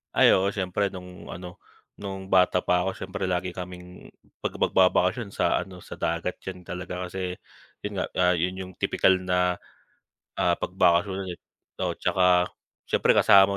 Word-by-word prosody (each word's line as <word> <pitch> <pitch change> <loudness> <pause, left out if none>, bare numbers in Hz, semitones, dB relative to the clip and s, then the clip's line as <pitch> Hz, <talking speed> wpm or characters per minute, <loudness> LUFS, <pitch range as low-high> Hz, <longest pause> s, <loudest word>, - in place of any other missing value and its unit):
Ay, - - +7
oo 95 +1 +2
siyempre 100 0 -1
nung 90 -1 -10
ano, 90 0 -8 0.4
nung 95 -1 -6
bata 90 -1 +4
pa 90 0 +2
ako 95 - 0
siyempre 95 +1 -5
lagi 90 0 -2
kaming 90 0 -9 0.3
pag - - 0
magbabakasyon 95 +3 +3
sa - - +1
ano 90 -2 -12
sa - - -9
dagat. 85 +2 -2
Yan 90 -2 -8
talaga 90 0 -5
kasi, 90 0 -4 0.4
yun - - -5
nga, - - 0
ah, 90 0 +4
yun 90 +2 -1
yung 95 0 -6
tipikal 95 +2 +3
na, 90 -1 +1 0.8
ah, 90 - +3
pag 90 - -4
bakasyonan, 95 +1 +2
eh. 85 - -10 0.4
Oo - - -1
'tsaka 90 -1 +3 0.3
siyempre - - +3
kasama 100 0 +6
90 Hz, 160 wpm, -26 LUFS, 90-95 Hz, 0.8 s, Ay